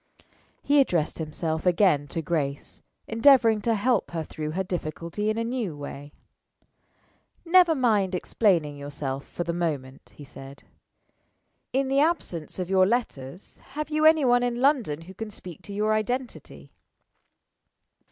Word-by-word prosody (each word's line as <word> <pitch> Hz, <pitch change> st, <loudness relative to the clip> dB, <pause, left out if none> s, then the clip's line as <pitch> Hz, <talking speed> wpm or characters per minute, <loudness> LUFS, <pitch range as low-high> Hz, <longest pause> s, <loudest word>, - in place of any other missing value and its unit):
He 290 Hz, 0 st, +4 dB
addressed 170 Hz, -, 0 dB
himself 160 Hz, 0 st, -3 dB
again 180 Hz, -5 st, +3 dB
to 165 Hz, +3 st, -4 dB
Grace, 145 Hz, -3 st, -3 dB, 0.3 s
endeavoring 230 Hz, -2 st, +5 dB
to 230 Hz, +1 st, +1 dB
help 235 Hz, +1 st, +1 dB
her 165 Hz, -2 st, -3 dB
through 155 Hz, 0 st, -6 dB
her 190 Hz, +3 st, -1 dB
difficulty 175 Hz, +3 st, -4 dB
in 215 Hz, -, -1 dB
a 230 Hz, -, 0 dB
new 230 Hz, -, -3 dB
way. 145 Hz, 0 st, -8 dB, 1.3 s
"Never 345 Hz, -1 st, +5 dB
mind 210 Hz, -8 st, +2 dB
explaining 170 Hz, -6 st, +1 dB
yourself 140 Hz, -1 st, -5 dB
for 175 Hz, -, -4 dB
the 170 Hz, -, -3 dB
moment," 145 Hz, -6 st, -4 dB
he 150 Hz, -, -11 dB
said. 135 Hz, 0 st, -12 dB, 1.1 s
"In 270 Hz, +1 st, 0 dB
the 270 Hz, +1 st, +2 dB
absence 285 Hz, -, -1 dB
of 180 Hz, -2 st, -3 dB
your 185 Hz, 0 st, +4 dB
letters, 185 Hz, -, -3 dB, 0.2 s
have 305 Hz, +1 st, -4 dB
you 305 Hz, 0 st, +1 dB
any 315 Hz, -2 st, +6 dB
one 245 Hz, 0 st, +4 dB
in 245 Hz, -1 st, -1 dB
London 250 Hz, -, +1 dB
who 180 Hz, +3 st, -12 dB
can 220 Hz, +3 st, -6 dB
speak 180 Hz, -5 st, -10 dB
to 205 Hz, -, -10 dB
your 210 Hz, +2 st, 0 dB
identity?" 245 Hz, +4 st, -4 dB
190 Hz, 145 wpm, -26 LUFS, 155-245 Hz, 1.3 s, any